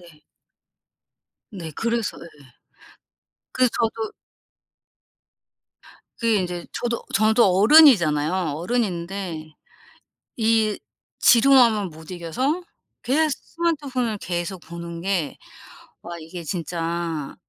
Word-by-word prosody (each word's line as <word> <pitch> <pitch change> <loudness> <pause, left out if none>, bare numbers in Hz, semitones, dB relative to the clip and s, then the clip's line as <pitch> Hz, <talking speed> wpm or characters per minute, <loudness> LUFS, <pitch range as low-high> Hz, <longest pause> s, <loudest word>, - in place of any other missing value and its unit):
네. 165 -4 -18 1.3
네 170 -6 -7
그래서 230 -1 -2
예. 170 - -9 1.2
그래서 255 -2 +2
저도 225 -1 -2 2.1
그게 230 -1 +2
인제 175 -1 -5
저도 235 -1 -3
저도 220 +3 +4
어른이잖아요. 195 - +6 0.2
어른인데 175 -5 -3 0.8
이 220 -2 +2 0.4
지루함을 235 -5 +5
못 160 +2 -13
이겨서 255 - -2 0.4
계속 305 +4 +1
스마트폰을 275 -10 -2
계속 175 0 -4
보는 170 0 -8
게 180 -6 -2 0.7
와 170 0 -7
이게 165 +2 -9
진짜 165 -2 -3
195 Hz, 190 characters per minute, -23 LUFS, 170-235 Hz, 2.1 s, 어른이잖아요